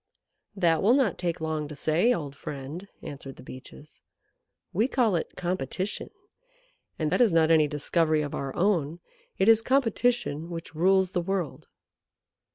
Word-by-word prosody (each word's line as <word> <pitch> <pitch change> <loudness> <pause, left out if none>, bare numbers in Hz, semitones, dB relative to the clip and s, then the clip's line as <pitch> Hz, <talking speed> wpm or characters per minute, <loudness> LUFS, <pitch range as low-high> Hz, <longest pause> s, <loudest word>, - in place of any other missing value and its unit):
"That 170 -5 +2
will 225 +6 +5
not 265 -8 +1
take 175 -2 -2
long 160 -1 -2
to 150 - -8
say, 160 - +2
old 145 - -2
friend," 145 +8 -7 0.2
answered 135 -1 -8
the - - -13
Beeches. 130 +4 -12 0.7
"We 215 +7 +2
call 235 -8 +2
it 165 - -3
competition, 180 +2 -3 0.9
and 155 -2 -1
that - - +2
is 235 -5 +5
not 165 -1 +4
any 155 -2 +5
discovery 155 +1 +1
of 145 - -5
our 135 -1 -3
own. 170 -4 +1 0.4
It 190 - +2
is 225 -1 +6
competition 240 - +1
which 165 -2 -7
rules 190 +3 +3
the 180 - 0
world." 180 -5 -3
170 Hz, 155 wpm, -27 LUFS, 150-195 Hz, 0.9 s, is